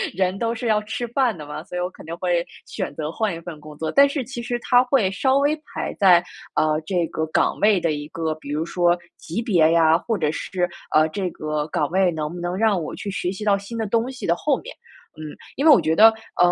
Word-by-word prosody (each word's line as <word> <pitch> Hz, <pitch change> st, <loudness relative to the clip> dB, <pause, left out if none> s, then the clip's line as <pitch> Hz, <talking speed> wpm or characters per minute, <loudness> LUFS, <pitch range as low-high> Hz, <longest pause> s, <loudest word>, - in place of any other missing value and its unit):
人 185 Hz, +1 st, 0 dB
都 230 Hz, 0 st, -1 dB
是 240 Hz, -, -6 dB
要 215 Hz, -2 st, +2 dB
吃 220 Hz, +3 st, -4 dB
饭 240 Hz, -4 st, +1 dB
的 150 Hz, -, -8 dB
嘛， 150 Hz, +1 st, -7 dB
所 180 Hz, -, -6 dB
以 -, -, -1 dB
我 180 Hz, -, 0 dB
肯 -, -, -14 dB
定 165 Hz, +1 st, -5 dB
会 175 Hz, -1 st, 0 dB, 0.2 s
选 -, -, -5 dB
择 155 Hz, 0 st, -4 dB
换 210 Hz, 0 st, -1 dB
一 -, -, -7 dB
份 165 Hz, -3 st, -8 dB
工 150 Hz, 0 st, -12 dB
作。 160 Hz, 0 st, -3 dB
但 280 Hz, 0 st, +6 dB
是 280 Hz, -2 st, -2 dB
其 240 Hz, 0 st, -7 dB
实 240 Hz, 0 st, -2 dB
它 245 Hz, 0 st, +4 dB
会 245 Hz, -7 st, +2 dB
稍 260 Hz, +7 st, +2 dB
微 285 Hz, +2 st, +2 dB
排 305 Hz, -, -6 dB
在， 180 Hz, -4 st, +6 dB, 0.3 s
呃， 155 Hz, 0 st, +2 dB
这 180 Hz, -3 st, +1 dB
个 160 Hz, -, -3 dB
岗 155 Hz, -, +1 dB
位 210 Hz, -2 st, +4 dB
的 165 Hz, -2 st, 0 dB
一 145 Hz, -1 st, -4 dB
个， 160 Hz, 0 st, -3 dB
比 155 Hz, -2 st, -12 dB
如 150 Hz, +2 st, -1 dB
说 175 Hz, 0 st, +2 dB, 0.2 s
级 195 Hz, +9 st, -4 dB
别 170 Hz, -9 st, +3 dB
呀， 165 Hz, -1 st, +5 dB
或 220 Hz, +6 st, -1 dB
者 150 Hz, -4 st, 0 dB
是， 180 Hz, +2 st, -2 dB, 0.2 s
呃， 155 Hz, +1 st, +4 dB
这 185 Hz, +2 st, -3 dB
个 155 Hz, -2 st, -3 dB
岗 150 Hz, -1 st, -1 dB
位 185 Hz, 0 st, +3 dB
能 155 Hz, -1 st, -4 dB
不 175 Hz, -, -7 dB
能 175 Hz, +1 st, -2 dB
让 210 Hz, -4 st, +2 dB
我 155 Hz, -, -5 dB
去 200 Hz, -, -5 dB
学 185 Hz, -1 st, -2 dB
习 195 Hz, +2 st, -7 dB
到 205 Hz, -2 st, +3 dB
新 200 Hz, +4 st, -8 dB
的 225 Hz, -, -1 dB
东 230 Hz, +4 st, 0 dB
西 255 Hz, -, -7 dB
的 170 Hz, -, +2 dB
后 280 Hz, +7 st, 0 dB
面。 -, -, -10 dB, 0.4 s
嗯， 155 Hz, -1 st, -7 dB, 0.2 s
因 280 Hz, -, -1 dB
为 320 Hz, -, +8 dB
我 280 Hz, -, +7 dB
觉 160 Hz, -, +1 dB
得， 220 Hz, +5 st, +9 dB, 0.3 s
嗯， 175 Hz, -, +5 dB
180 Hz, 275 characters per minute, -22 LUFS, 160-225 Hz, 0.4 s, 得